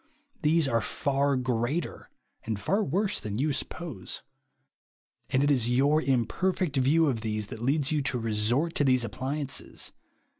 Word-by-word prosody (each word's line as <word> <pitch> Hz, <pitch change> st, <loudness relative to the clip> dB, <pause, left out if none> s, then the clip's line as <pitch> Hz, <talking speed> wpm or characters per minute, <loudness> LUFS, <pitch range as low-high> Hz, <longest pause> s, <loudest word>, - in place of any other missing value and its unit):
These 155 Hz, 0 st, +3 dB
are 115 Hz, -3 st, +2 dB
far 140 Hz, +2 st, 0 dB
greater 130 Hz, +5 st, -2 dB, 0.3 s
and 110 Hz, -2 st, -3 dB
far 195 Hz, -, +1 dB
Avorse 195 Hz, +7 st, 0 dB
than 105 Hz, -1 st, -4 dB
you 145 Hz, +3 st, +1 dB
suppose. 140 Hz, -, -5 dB, 1.1 s
And 130 Hz, +2 st, +2 dB
it 145 Hz, -, +3 dB
is 125 Hz, -4 st, +2 dB
your 140 Hz, +5 st, +3 dB
imper 135 Hz, -, +1 dB
fect 165 Hz, -6 st, -1 dB
view 145 Hz, +5 st, +4 dB
of 125 Hz, -7 st, 0 dB
these 110 Hz, -1 st, -2 dB
that 110 Hz, -, -8 dB
leads 140 Hz, +3 st, +1 dB
you 150 Hz, -1 st, +1 dB
to 140 Hz, -2 st, -1 dB
resort 115 Hz, +8 st, +1 dB
to -, -, +3 dB
these 130 Hz, -3 st, +3 dB
appliances. 135 Hz, +5 st, -3 dB
135 Hz, 155 wpm, -28 LUFS, 120-150 Hz, 1.1 s, view